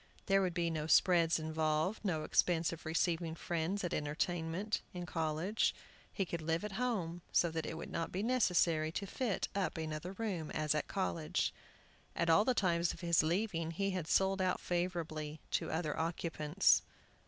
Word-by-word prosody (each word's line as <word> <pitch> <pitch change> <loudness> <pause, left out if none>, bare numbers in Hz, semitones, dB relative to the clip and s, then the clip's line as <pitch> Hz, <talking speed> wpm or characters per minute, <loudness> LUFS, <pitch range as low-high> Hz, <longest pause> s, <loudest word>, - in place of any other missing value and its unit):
There 195 0 +4
would 180 -2 -1
be 170 -1 +1
no 155 -1 -2
"spreads" 170 -1 +5
involved; 160 +5 0
no 165 -7 0
expense 170 0 +2
of 165 0 -8
receiving 165 0 0
friends 175 +5 -2
at 175 - -2
entertainments 165 +6 -1
in 175 0 -4
college; 165 +5 0 0.4
he 195 - -1
could 170 -1 -4
live 165 +3 0
at 210 - -4
home, 195 -7 -2
so 170 - +3
that 160 0 -3
it - - -4
would - - -7
not 165 -1 -2
be 190 +3 -2
necessary 175 -10 +2
to 200 - -2
fit 220 0 -1
up 185 -6 -1
another 160 +3 -4
room, 190 -7 -3
as 155 -1 +1
at 150 - -1
college. 170 -5 -1 0.6
At 170 -1 +2
all 205 +6 +5
the 255 - +2
times 170 -4 +2
of - - -13
his 170 -2 +4
leaving 165 0 0
he 195 +4 -1
had 180 -4 -3
sold 190 +2 +2
out 185 -1 +1
favorably 165 -4 -2
to - - 0
other 160 -2 -1
occupants. 165 +1 +2
170 Hz, 175 wpm, -35 LUFS, 160-190 Hz, 0.6 s, spreads